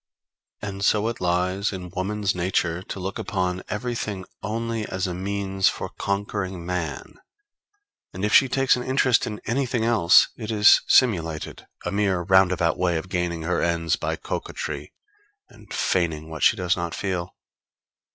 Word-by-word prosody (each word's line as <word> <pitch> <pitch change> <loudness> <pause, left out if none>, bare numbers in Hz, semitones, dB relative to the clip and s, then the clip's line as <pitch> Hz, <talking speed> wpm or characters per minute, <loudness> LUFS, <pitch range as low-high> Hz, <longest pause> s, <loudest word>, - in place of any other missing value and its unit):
And 100 -1 -4
so 105 +2 +3
it 115 - -6
lies 90 +3 0
in 90 -3 -7
woman's 100 +2 -1
nature 90 -1 0
to 95 - -7
look 95 +2 -4
upon 95 -3 -2
everything 105 -3 -3 0.2
only 115 +2 -2
as 95 +1 -2
a 90 - -3
means 95 +1 0
for - - -5
conquering 100 -3 -3
man; 85 -6 -4 1.0
and 95 +3 -3
if 105 - -1
she 135 - +6
takes 135 +1 +3
an 125 - -4
interest 130 -1 +2
in 105 -1 -5
anything 120 -2 0
else, 105 -7 +5
it 110 -2 -7
is 105 -1 +6
simulated 80 - +2 0.2
a - - -1
mere 100 -3 +1
roundabout 90 -3 +3
way 90 -2 +1
of 80 +4 -6
gaining 90 -2 -2
her 90 +2 0
ends 85 -1 +1
by - - -2
coquetry, - - -5 0.6
and - - -18
feigning 80 -3 -1
what 80 - -7
she - - +5
does 90 0 +1
not 85 -2 -4
feel. 90 -3 -3
95 Hz, 155 wpm, -24 LUFS, 90-105 Hz, 1.0 s, she